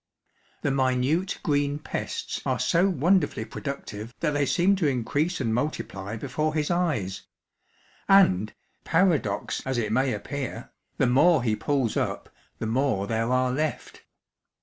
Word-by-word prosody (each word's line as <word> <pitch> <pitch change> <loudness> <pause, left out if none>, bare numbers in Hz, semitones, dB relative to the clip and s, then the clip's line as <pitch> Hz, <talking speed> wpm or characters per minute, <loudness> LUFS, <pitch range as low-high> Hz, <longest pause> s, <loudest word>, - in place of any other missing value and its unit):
The 140 - +1
minute 135 +7 +1
green 145 -1 +1
pests 150 - -4
are - - 0
so 180 +4 +2
wonderfully 175 - +1
productive 115 -3 -6
that - - +1
they 145 -1 +1
seem 185 +3 +3
to 170 -5 +1
increase 145 +7 0
and 115 -4 0
multiply 110 -6 -3
before 150 +6 -2
his 150 +1 0
eyes; 150 - -1 0.8
and, 110 - +5 0.3
paradox 160 - +1
as 130 -2 -2
it 110 -3 -1
may 130 +3 +2
appear, 140 -1 -5 0.3
the - - +3
more 140 +4 +4
he 110 -3 +1
pulls 135 -3 0
up - - -2 0.3
the - - -4
more 115 -3 +1
there 115 +2 -1
are 130 0 +2
left. 155 +4 -3
135 Hz, 140 wpm, -26 LUFS, 115-155 Hz, 0.8 s, and